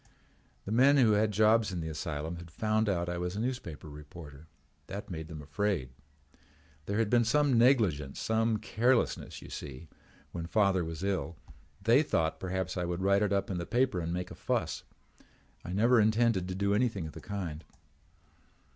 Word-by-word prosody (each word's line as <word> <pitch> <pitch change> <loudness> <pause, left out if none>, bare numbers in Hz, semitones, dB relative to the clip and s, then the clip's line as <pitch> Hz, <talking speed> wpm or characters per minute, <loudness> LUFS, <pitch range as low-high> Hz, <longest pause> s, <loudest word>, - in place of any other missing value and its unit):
"The 100 - -5
men 135 +5 +5
who 120 -5 +5
had 105 +1 +3
jobs 110 +1 +3
in 90 - -3
the 80 - -4
asylum 80 +1 -4
had 85 0 -10
found 110 +5 0
out 85 -3 0
I 90 0 -3
was 90 +1 -3
a - - -3
newspaper 115 - -4
reporter. 75 0 -11 0.4
That 100 0 -7
made 80 -2 -5
them 80 -2 -8
afraid. 75 -3 -1 1.0
There 100 - -1
had 115 -1 +2
been 120 +2 +4
some 145 +3 +3
negligence, 105 - +3
some 110 0 +1
carelessness, 120 +4 0
you - - -11
see, 75 +2 -8 0.4
when 85 -1 -5
father 100 -2 +2
was 80 +1 -6
ill. 95 -4 -2 0.5
They 115 +6 +5
thought 80 - 0
perhaps 95 0 -3
I 90 - 0
would 85 +1 -3
write 100 +1 +3
it 105 -2 +1
up 100 0 0
in 90 - -2
the 85 - -4
paper 120 -3 +1
and 85 0 -3
make 90 +1 -3
a - - -6
fuss. - - -2 0.8
I - - -6
never 115 +5 +4
intended 110 -3 +2
to 90 - -4
do 100 +1 +1
anything 105 -5 0
of 80 - -8
the - - -9
kind. 90 -6 -5
95 Hz, 180 wpm, -30 LUFS, 85-110 Hz, 1.0 s, men